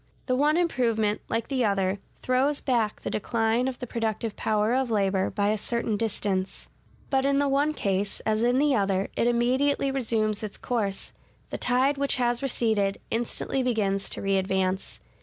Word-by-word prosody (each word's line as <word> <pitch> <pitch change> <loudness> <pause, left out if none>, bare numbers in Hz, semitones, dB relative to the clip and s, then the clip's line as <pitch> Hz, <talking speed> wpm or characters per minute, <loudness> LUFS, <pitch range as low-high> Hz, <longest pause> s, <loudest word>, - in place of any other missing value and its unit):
The 255 - +1
one 300 +4 +3
improvement, 230 -11 +1
like 225 0 -1
the 265 -3 0
other, 195 -2 +1 0.2
throws 265 +3 +2
back 230 -5 0
the - - -4
decline 225 +3 0
of 260 -2 -3
the 250 - -5
productive 225 -2 -2
power 215 +1 +1
of 260 -1 +1
labor 195 -3 +1
by 205 -1 0
a 215 0 0
certain 235 0 -1
distance: 200 -3 -2 0.4
but 265 -1 +2
in 275 0 +2
the 285 0 +2
one 285 +3 +1
case, 200 -2 -1
as 220 0 0
in 245 +1 +3
the 285 0 +3
other, 195 -2 0
it 235 - +1
immediately 260 +4 +2
resumes 220 -5 0
its 215 -2 -6
course; 205 -5 -3 0.4
the - - -4
tide 265 +3 +2
which 280 0 +2
has 240 -1 +1
receded, 220 -7 0
instantly 240 +3 -1
begins 205 -6 0
to - - -4
readvance. 190 -1 0
230 Hz, 170 wpm, -26 LUFS, 205-260 Hz, 0.4 s, one